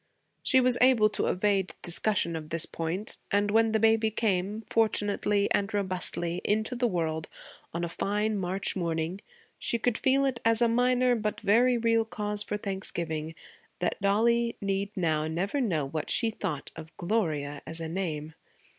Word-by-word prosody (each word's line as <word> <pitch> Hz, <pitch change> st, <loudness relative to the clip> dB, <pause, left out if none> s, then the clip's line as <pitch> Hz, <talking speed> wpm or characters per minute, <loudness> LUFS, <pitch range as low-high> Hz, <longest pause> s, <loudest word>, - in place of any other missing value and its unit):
She 260 Hz, -, +4 dB
was 250 Hz, -1 st, +4 dB
able 245 Hz, -4 st, +5 dB
to -, -, -2 dB
evade 195 Hz, 0 st, 0 dB
discussion 175 Hz, -1 st, 0 dB
of 155 Hz, -1 st, -6 dB
this 165 Hz, 0 st, +3 dB
point, 170 Hz, +6 st, -3 dB
and 205 Hz, 0 st, +1 dB
when 225 Hz, +1 st, +3 dB
the 220 Hz, -, +2 dB
baby 225 Hz, 0 st, +3 dB
came, 210 Hz, -1 st, -1 dB
fortunately 205 Hz, -2 st, +1 dB
and 200 Hz, -1 st, +1 dB
robustly, 180 Hz, -3 st, -1 dB
into 215 Hz, +4 st, 0 dB
the 245 Hz, 0 st, +1 dB
world 160 Hz, -5 st, -2 dB, 0.4 s
on 170 Hz, +1 st, -3 dB
a -, -, 0 dB
fine 210 Hz, +5 st, -1 dB
March 190 Hz, +1 st, -1 dB
morning, 170 Hz, +1 st, -2 dB, 0.4 s
she 235 Hz, -, 0 dB
could 230 Hz, 0 st, 0 dB
feel 270 Hz, +1 st, +3 dB
it 260 Hz, -3 st, -1 dB
as 230 Hz, 0 st, +3 dB
a 240 Hz, -, +4 dB
minor 250 Hz, +1 st, +3 dB
but 215 Hz, -2 st, -2 dB
very 235 Hz, +4 st, +4 dB
real 230 Hz, -1 st, +2 dB
cause 210 Hz, -2 st, +2 dB
for 210 Hz, 0 st, -2 dB
thanksgiving 170 Hz, -6 st, -4 dB, 0.4 s
that 180 Hz, -, -2 dB
Dollie 230 Hz, +4 st, +2 dB
need 195 Hz, 0 st, -1 dB
now 155 Hz, -3 st, +1 dB
never 190 Hz, -, -1 dB
know 165 Hz, -, 0 dB
what 155 Hz, +3 st, -4 dB
she 230 Hz, -2 st, +3 dB
thought 175 Hz, -10 st, -4 dB
of 160 Hz, 0 st, -11 dB
Gloria 155 Hz, -8 st, -1 dB
as 160 Hz, +1 st, -5 dB
a 165 Hz, -, -4 dB
name. 160 Hz, -3 st, -4 dB
200 Hz, 165 wpm, -28 LUFS, 170-225 Hz, 0.4 s, able